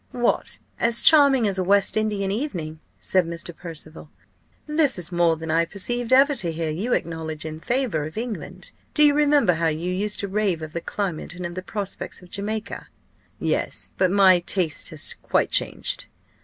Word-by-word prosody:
"What! 240 -1 0 0.2
as 235 0 +4
charming 280 -7 +6
as 190 -1 0
a - - +1
West 200 +2 +3
Indian 210 -3 0
evening?" 175 - -4 0.2
said 185 -1 +2
Mr. 170 0 -5
Percival. 160 -2 -8 0.6
"This 300 -4 +2
is 175 0 -2
more 170 -2 +2
than 160 0 -5
I 165 +1 +3
expected 225 +8 0
ever 275 +3 +6
to 175 -11 -1
hear 160 -1 -3
you 210 +11 -2
acknowledge 160 -2 -3
in 155 0 -6
favour 235 - -1
of 155 +6 -9
England. 230 -1 -6 0.2
Do 300 - +6
you 290 - +5
remember 290 -9 +3
how 165 0 0
you 165 +3 -2
used 205 +3 -1
to 200 - -3
rave 195 -5 -1
of 155 0 -8
the 170 - -3
climate 180 -4 -4
and 180 0 -6
of 175 - -5
the 185 - -5
prospects 195 -1 -5
of 180 - -17
Jamaica?" 215 +2 -5 0.5
"Yes, - - -2
but 185 - +3
my 190 -2 +5
taste 175 -2 0
has 155 -2 -2
quite - - +1
changed." - - -1
190 Hz, 185 wpm, -23 LUFS, 165-225 Hz, 0.6 s, charming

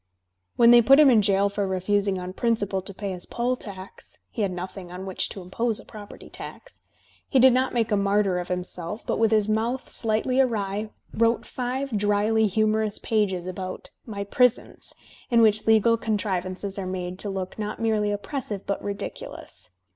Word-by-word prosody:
When 235 0 +6
they 240 0 +8
put 270 +5 +6
him 290 -3 +8
in 225 -3 +5
jail 200 0 +3
for 200 0 -2
refusing 195 +1 0
on 180 0 -6
principle 205 -4 0
to 190 - -9
pay 200 0 -5
his 180 -1 -5
poll 245 +1 -1
tax 195 -5 -10
(he 230 - -4
had 200 -2 +1
nothing 180 0 -7
on 180 +1 -7
which 190 -1 -1
to 195 - -8
impose 220 +5 -1
a - - -13
property 210 -1 -11
tax), - - -9 0.5
he 270 - +2
did 260 0 +7
not 260 +1 +1
make 230 -1 +1
a - - +4
martyr 200 -2 +2
of 175 - -5
himself, 180 +2 -4
but - - -1
with 225 -1 +4
his 215 -2 +3
mouth 230 +4 -1
slightly 230 +3 +2
awry 210 -4 -1 0.2
wrote 230 +1 +2
five 255 0 -3
dryly 210 +2 +2
humorous 215 +1 +1
pages 195 -5 0
about 185 0 -6 0.2
"My 200 -3 -4
Prisons," 250 +4 0 0.3
in 235 -2 +4
which 215 0 +3
legal 225 +1 +5
con 220 -1 -1
trivances 190 0 -3
are 190 - -4
made 185 0 -4
to 205 - -2
look 190 +1 -5
not 210 0 -4
merely 220 -2 +1
oppressive 205 -1 -4
but 200 - -2
ridicu 200 0 -5
lous. - - -11
210 Hz, 185 wpm, -25 LUFS, 190-230 Hz, 0.5 s, they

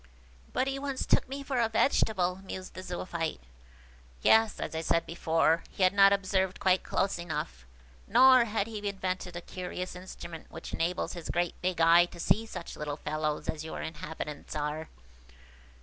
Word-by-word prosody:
"But 260 - +1
he 270 0 -2
once 275 -1 -3
took - - +2
me 275 +1 -5
for 270 -2 -1
a 230 -1 +2
vegetable," 200 -6 +2
mused 185 -1 -7
the - - -7
Zoophyte. 175 -3 -3 0.8
"Yes; 220 -1 +5
as - - -4
I 160 - -2
said 165 +1 +1
before, 165 0 +2
he 190 - -2
had 185 +1 +5
not 195 0 +7
observed 190 -1 +1
quite 185 0 +3
close 195 -3 -1
enough, 65 - -5 0.4
nor 255 +1 +7
had 215 -2 -1
he 220 -2 -6
then 200 -1 -2
invented 185 -1 -3
a 175 - -4
curious 180 0 -6
instrument 175 -3 -9
which 160 - -9
enables 175 +2 -1
his 170 -2 -7
great 175 0 0
big 180 -2 -1
eye 165 +1 +7
to 175 - -13
see 225 +6 +2
such 170 - -7
little 150 -1 -4
fellows 155 0 -2
as 155 0 -3
your 160 - -5
inhabitants 155 -2 -6
are. 150 +1 -3
180 Hz, 175 wpm, -30 LUFS, 165-200 Hz, 0.8 s, not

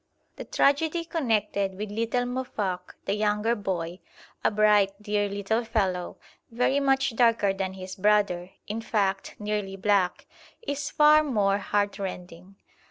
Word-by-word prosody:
The - - -7
tragedy 320 +4 +1
connected 210 - 0
with 210 0 -5
little 230 +3 0
Muoffok, 210 -8 -4
the - - 0
younger 210 +2 +1
boy, 180 -4 -3 0.4
a - - +4
bright, 210 -2 +4
dear 210 -1 -1
little 205 +4 -1
fellow, 195 -6 -1 0.3
very 250 +4 +1
much 270 -2 +1
darker 230 -4 +3
than 190 -1 -3
his 185 0 -8
brother, 200 -3 +2 0.2
in 220 +2 -4
fact 195 -3 -1
nearly 210 -2 -3
black, 195 -2 +1 0.4
is 290 -6 -3
far 300 +1 +6
more 205 -8 +1
heartrending. 195 -3 -3
210 Hz, 130 wpm, -26 LUFS, 195-235 Hz, 0.4 s, far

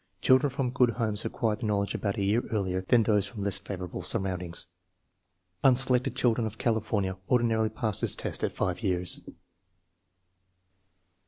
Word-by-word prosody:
Children 130 +2 +4
from 135 -2 -2
good 125 -1 +3
homes 110 -3 -1
acquire 110 -3 -1
the 110 - -5
knowledge 100 -1 0
about 100 -2 -2
a 100 - -1
year 105 +5 +2
earlier 95 -4 -1
than 115 +5 +3
those 105 -2 +1
from 105 -4 -7
less 100 -1 0
favorable 90 -3 -6
surroundings. 90 -2 -1 1.0
Unselected 125 -1 +4
children 115 -2 +1
of 110 +1 -8
California 105 -4 -1
ordinarily 115 -3 +2
pass 110 -2 -1
the - - 0
test - - -1
at - - 0
5 90 +2 -2
years. 90 -4 +2
110 Hz, 150 wpm, -28 LUFS, 95-120 Hz, 1.0 s, Children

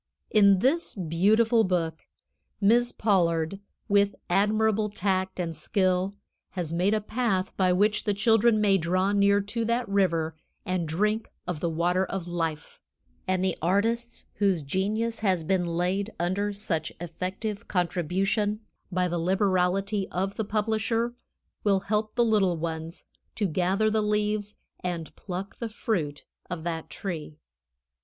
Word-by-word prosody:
In 200 -2 +6
this 275 - +1
beautiful 215 +7 +3
book, 170 -4 -1 0.5
Miss 235 +4 +4
Pollard, 175 -3 +1 0.3
with 200 -1 +3 0.2
admirable 215 +2 +2
tact 190 -2 -1
and 165 -2 -2
skill, 185 +4 0 0.4
has 170 -4 -3
made 185 +5 +2
a - - +1
path 210 -4 -1
by 185 -2 +3
which 210 +3 +2
the 205 - +1
children 225 +1 +4
may 200 -2 +4
draw 185 +4 +1
near 200 0 +4
to 220 +4 -3
that 235 +1 0
river 165 -5 +1 0.3
and 185 -4 -1
drink 210 +7 0 0.2
of 180 -4 -3
the 170 - 0
water 175 +3 +1
of 190 -2 -4
life; 165 -3 -3 0.5
and 185 0 +1
the 185 - +1
artists 225 +7 0
whose 195 -6 +2
genius 215 +9 -1
has 185 -6 +1
been 180 +2 +1
laid 180 +5 -1
under 190 +4 0
such 200 -6 -2
effective 185 +5 -4
contribution 190 +4 0 0.3
by 180 0 +1
the 175 -1 -2
liberality 190 +2 +1
of 195 +2 -2
the 220 - -1
publisher, 220 +2 0 0.5
will 195 -2 +3
help 210 +1 -1
the 240 -1 +4
little 200 -6 +2
ones 165 +1 -5 0.3
to 210 - 0
gather 185 +5 +1
the 215 0 +2
leaves 210 0 0 0.2
and 170 -3 -4
pluck 190 +1 -6
the 230 - -3
fruit 170 -10 -2 0.2
of 165 -2 -4
that 165 -2 -4
tree. 160 -6 -5
195 Hz, 140 wpm, -27 LUFS, 175-210 Hz, 0.5 s, In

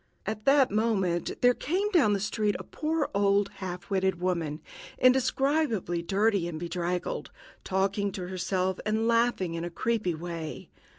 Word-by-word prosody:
At 215 +2 -4
that 275 -3 +5
moment 195 -6 0
there 245 0 +7
came 380 +11 -1
down 280 - +4
the 200 - 0
street 210 0 0
a - - -8
poor 310 -1 -2
old 200 0 +3
half 180 0 -6
witted 190 -2 +1
woman, 170 -4 -1 0.4
indescribably 255 - +2
dirty 200 0 +1
and 160 -2 -5
bedraggled, 175 +1 -3 0.3
talking 195 +1 0
to 180 -2 -5
herself 185 0 -1
and 220 +1 0
laughing 230 -7 +2
in 165 0 -3
a 175 - -3
creepy 210 -1 -1
way. 165 -1 -6
195 Hz, 150 wpm, -28 LUFS, 180-230 Hz, 0.4 s, there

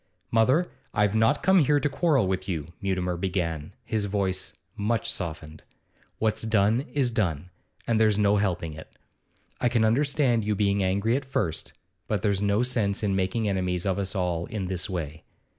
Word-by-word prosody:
'Mother, 130 +10 +3 0.2
I've 105 0 +3
not 110 0 +2
come 190 0 +5
here 145 -1 +4
to 145 - +1
quarrel 145 - +2
with 95 +1 -2
you,' 80 -5 -2 0.2
Mutimer 90 -2 -1
began, 85 -3 -2
his 110 -2 -1
voice 95 -2 -2 0.2
much 110 +1 0
softened. 80 -3 -6 0.6
'What's 110 -1 0
done 110 +4 +2
is 135 -4 +2
done, 90 -6 -1 0.3
and 115 -2 +1
there's 110 -2 +4
no 105 0 +3
helping 90 -5 -1
it. 80 +1 -12 0.6
I 125 - +2
can 115 -2 +2
understand 130 -1 +2
you 105 0 0
being 100 0 +1
angry 100 +5 +1
at 140 - -1
first, 100 - -2 0.3
but 105 -4 -1
there's 100 -2 +1
no 105 +3 +2
sense 110 -5 0
in 100 -2 +1
making 95 +4 0
enemies 90 -2 -1
of 95 0 0
us 100 +1 -3
all 90 -3 -1
in 105 -4 -4
this 95 +2 -3
way. 80 -4 -5
100 Hz, 175 wpm, -26 LUFS, 90-115 Hz, 0.6 s, come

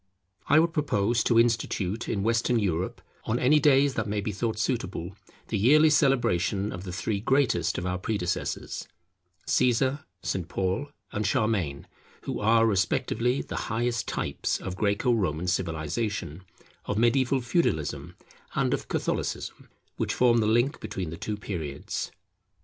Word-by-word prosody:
I 150 - +5
would 165 +1 +4
propose 115 -7 +1
to 115 - +4
institute 115 -3 0
in 100 -3 -1
Western 115 +2 +2
Europe 90 -4 -1 0.2
on 110 - 0
any 145 +5 +4
days 140 -1 +4
that - - -2
may 105 0 -1
be 105 +1 -2
thought 110 +2 -2
suitable, 100 -6 -2 0.3
the 110 - 0
yearly 150 +8 +6
celebration 105 - +2
of 90 +2 -7
the 90 - -5
three 100 +3 -2
greatest 135 +4 +1
of 90 - -3
our 90 0 -1
predecessors, 95 -3 -3 0.6
Caesar, 130 +3 +2 0.2
St. 90 -4 -2
Paul 95 +10 -1 0.2
and 105 -1 -1
Charlemagne, 95 -11 0 0.4
who - - -3
are 115 +2 +4
respectively 115 +4 +1
the - - -7
highest 115 +1 -1
types - - -2
of 95 - -5
Greco 105 +5 +1
Roman 90 -7 0
civilization, 90 0 -2 0.4
of 100 - -2
Mediaeval 130 +3 +3
Feudalism, 120 - -1 0.4
and - - +1
of - - -3
Catholicism, - - -3 0.3
which - - -1
forms 120 -2 +4
the 105 - +2
link 120 +7 +2
between 90 -5 -5
the - - -5
two 105 +1 -4
periods. 80 -9 -4
110 Hz, 145 wpm, -27 LUFS, 95-120 Hz, 0.6 s, yearly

